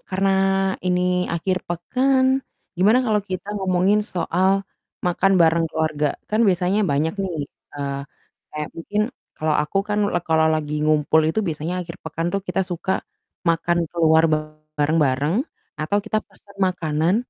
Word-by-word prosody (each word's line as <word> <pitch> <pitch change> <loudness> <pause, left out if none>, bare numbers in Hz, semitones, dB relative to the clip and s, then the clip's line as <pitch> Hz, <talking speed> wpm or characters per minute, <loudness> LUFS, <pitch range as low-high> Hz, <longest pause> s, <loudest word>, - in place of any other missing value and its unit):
karena 195 +1 +1 0.6
ini 180 0 +2 0.3
akhir 185 +2 0
pekan, 260 +10 +1 0.5
gimana 205 +7 +5
kalau 215 -2 +2
kita 185 +1 -4
ngomongin 190 +1 +2
soal 185 -1 0 0.6
makan 185 +2 +2
bareng 165 0 +4
keluarga? 155 -2 0 0.2
Kan 215 +1 +1
biasanya 185 +2 +2
banyak 155 0 0
nih, 185 -4 -3 0.4
eee, 140 -1 -3 0.5
kayak 150 0 -4
mungkin 205 +5 -2 0.4
kalau 155 0 0
aku 150 +6 -1
kan 210 0 0
lag 175 - +1
kalau 160 0 +4
lagi 150 -1 -2
ngumpul 155 0 +3
itu 190 +7 0
biasanya 160 +1 -3
akhir 170 0 -7
pekan 165 +1 -3
tuh 200 - 0
kita 180 - 0
suka 175 +2 -3 0.6
makan 170 +1 +2
keluar 160 -1 +4 0.5
bareng 150 +2 +2
bareng, 140 +5 +1 0.5
atau 155 +7 +1
kita 220 0 0
pesan 200 -1 -14
makanan, 165 -1 0
170 Hz, 140 wpm, -22 LUFS, 155-190 Hz, 0.6 s, gimana